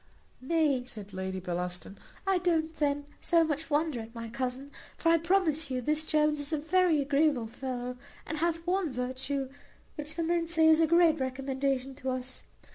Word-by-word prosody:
"Nay," 285 -2 +2
said 210 -5 -8
Lady 190 0 -3
Bellaston, 180 +2 -4 0.3
"I 385 -2 +3
don't 325 -2 +1
then 290 -1 0
so 335 -1 +4
much 315 0 -2
wonder 300 -3 +1
at 225 +1 -9
my 230 0 -6
cousin; 260 +3 -4 0.3
for 330 - +2
I 335 0 +5
promise 325 -4 +1
you 255 -1 -1
this 305 +5 0
Jones 300 -1 +2
is 290 +1 -3
a 310 - +1
very 335 +1 +3
agreeable 280 -3 +2
fellow, 250 +1 -5 0.3
and 310 -1 -4
hath 335 0 0
one 365 -1 +1
virtue, 260 +2 -3 0.5
which 300 +1 -4
the 335 - -1
men 335 0 +1
say 325 -1 +4
is 320 0 +6
a 325 - +4
great 335 -1 +5
recommendation 265 0 -1
to 265 -2 -3
us. 255 0 -3
290 Hz, 180 wpm, -30 LUFS, 255-325 Hz, 0.5 s, is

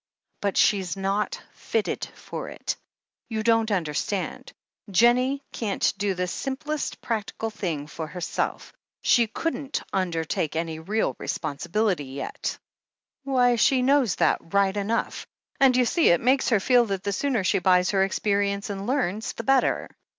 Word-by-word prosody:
"But 200 -1 -1
she's 195 -2 +2
not 195 +2 -1
fitted 455 -1 -2
for - - -7
it! - - -4 0.5
You 220 -2 -2
don't 225 0 +3
understand. 185 +1 -2 0.4
Jennie 250 +7 +3
can't 210 -4 0
do 200 -1 -1
the 180 0 -1
simplest 275 - -3
practical 225 0 -3
thing 170 -9 -3
for 155 +1 -6
herself 175 +1 -3
— - - -68
she 235 -2 +4
couldn't 280 +3 -3
imdertake 165 -4 -1
any 160 -1 -2
real 205 +7 -1
responsibility 165 +3 -1
yet." 135 +1 -5 0.7
"Why, 250 -3 +3
she 255 +3 +4
knows 260 - +3
that - - +2
right 200 -1 +3
enough. 205 +3 -2 0.3
And, 265 -2 +5
you 250 - +4
see, 330 +7 +3
it 170 - +5
makes 260 +1 +2
her 225 -5 +4
feel 245 +4 +4
that 195 -3 -3
the 200 - -1
sooner 250 -2 0
she 185 - +2
buys 180 0 +3
her 195 -1 +3
experience 200 +1 0
and 200 +1 -5
learns, 225 -5 -1
the 230 - -6
better. 270 +2 +2
205 Hz, 150 wpm, -25 LUFS, 185-245 Hz, 0.7 s, And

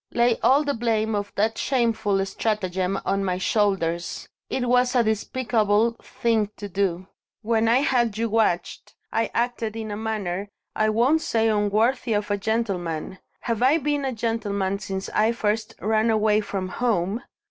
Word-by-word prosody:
"Lay 235 -1 +2
all 280 +3 +4
the 285 -1 -1
blame 225 -2 0
of 205 -1 -2
that 220 +2 0
shameful 225 -6 +1
stratagem 195 -2 -1
on 195 0 0
my 180 -2 -1
shoulders. 185 -4 0 0.2
It 250 -1 -1
was 250 +1 +3
a 245 - +5
despicable 220 0 +1
thing 225 -3 0
to 205 - -6
do. 185 -2 -1 0.4
When 225 0 +2
I 240 +4 +4
had 240 -6 +1
you 230 +1 0
watched, 215 -5 -1 0.2
I 225 +1 +1
acted 235 -2 -1
in 220 -1 -5
a - - -3
manner 205 -3 -3 0.3
I 215 0 +2
won't 250 +9 +3
say 225 -5 +1
unworthy 220 +4 +1
of 205 0 -1
a 205 - +1
gentleman; 190 -6 -2 0.2
have 230 -2 -2
I 265 +5 +5
been 290 -1 -1
a 265 - -1
gentleman 205 -4 -1
since 190 -1 -4
I 220 +2 +2
first 215 -1 -1
ran 220 +2 +1
away 215 -1 +3
from 195 -2 -4
home? 210 0 0
220 Hz, 160 wpm, -24 LUFS, 200-235 Hz, 0.4 s, a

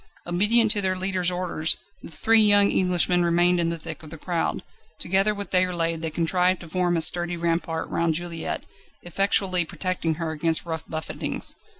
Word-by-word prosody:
Obedient 210 +6 +3
to 210 -2 +4
their 185 -1 0
leader's 185 -1 0
orders 175 -3 0 0.2
the - - -10
three 225 +7 +3
young 205 -1 +5
Englishmen 180 -1 +2
remained 175 +1 +2
in 165 -1 +1
the 170 - -3
thick 165 0 -7
of 155 - -12
the 165 - -9
crowd: 170 +1 -3 0.3
together 195 +3 +1
with 200 0 -6
Déroulède 175 -3 0
they 165 - -3
contrived 180 +3 0
to 170 - -11
form 175 0 0
a 165 - 0
sturdy 175 +1 +1
rampart 165 -1 -2
round 165 -1 -1
Juliette, 170 -1 -5 0.4
effectually 185 0 +2
protecting 170 -1 -3
her 165 0 -4
against 160 +2 0
rough 160 -2 -6
buffetings. 155 0 -4
175 Hz, 175 wpm, -24 LUFS, 165-185 Hz, 0.4 s, young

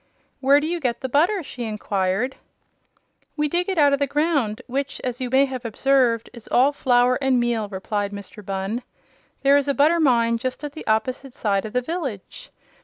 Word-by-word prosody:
"Where 275 +1 +5
do 295 - -3
you 340 +2 -2
get 245 -5 -2
the 260 - -3
butter?" 345 - +2
she 250 -3 -7
inquired. 210 +2 -1 1.0
"We 300 0 +1
dig 350 +5 -1
it 380 - -2
out 290 -2 +5
of 280 - +1
the 280 - +1
ground, 285 -7 0
which, 275 +2 -3
as 250 0 -4
you 250 - -2
may 265 +2 +4
have 260 -2 -6
observed, 235 0 +2
is 235 -3 -12
all 265 +3 +4
flour 250 -2 +3
and 265 -2 +2
meal," 235 -3 0
replied 205 +1 -3
Mr. 205 +1 -9
Bunn. 195 +4 -3 0.6
"There 280 +1 +6
is 285 0 0
a 280 - +1
butter 315 +4 +4
mine 235 -6 +3
just 255 +3 -4
at 295 -1 -5
the 315 - -9
opposite 255 +4 -1
side 200 -5 0
of 215 - -7
the 250 0 0
village. 270 - -5
255 Hz, 195 wpm, -23 LUFS, 225-280 Hz, 1.0 s, There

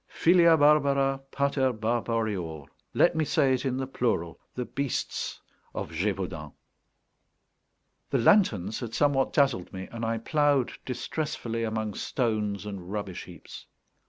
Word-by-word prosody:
Filia 170 -1 +5
barbara 140 -2 +3
pater 140 -2 +1
barbarior. 110 - -2 0.3
Let 170 - +4
me 160 - +2
say 145 -4 +2
it 130 +1 -1
in 130 -1 0
the 135 - -2
plural: 115 -10 -1 0.2
the 125 - -3
Beasts 140 0 -3 0.4
of - - -4
Gévaudan. 90 -4 -3 1.6
The 135 - +1
lanterns 115 - +3
had 115 -3 -5
somewhat 140 -2 +2
dazzled 135 -11 +1
me, 95 0 -7
and 115 0 -6
I 115 0 0
ploughed 145 +2 +2 0.2
distressfully 125 -4 -3
among 110 -1 -2
stones 105 -5 -1
and 95 -3 -7
rubbish 100 -3 -4
heaps. 85 -3 -12
120 Hz, 130 wpm, -27 LUFS, 105-140 Hz, 1.6 s, Filia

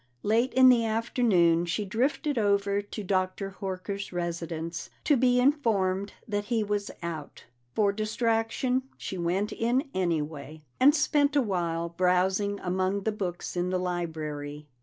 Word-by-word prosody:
Late 230 +5 +2
in 260 0 +8
the 240 -2 +5
afternoon 215 -7 +2
she 205 +5 -1
drifted 260 - 0
over 200 -1 +2
to 205 +1 -7
Dr. 190 +1 -1
Horker's 195 +1 -4
residence, 170 -1 -4
to 295 - +4
be 250 -1 +3
informed 210 -8 +1
that 205 -1 -2
he 225 -1 0
was 205 0 -2
out. 160 -4 -6 0.3
For 205 -2 +3
distraction, 225 +4 0 0.2
she 190 - -5
went 180 +5 0
in 255 +5 0
anyway, 155 -4 -2 0.2
and 285 +4 +6
spent 295 -1 +2
a 285 - +5
while 170 -5 -1
browsing 185 +3 +1
among 185 +2 -1
the 220 - +1
books 185 -5 -4
in 180 +1 0
the 185 - 0
library. 155 -5 -4
200 Hz, 140 wpm, -28 LUFS, 175-225 Hz, 0.3 s, in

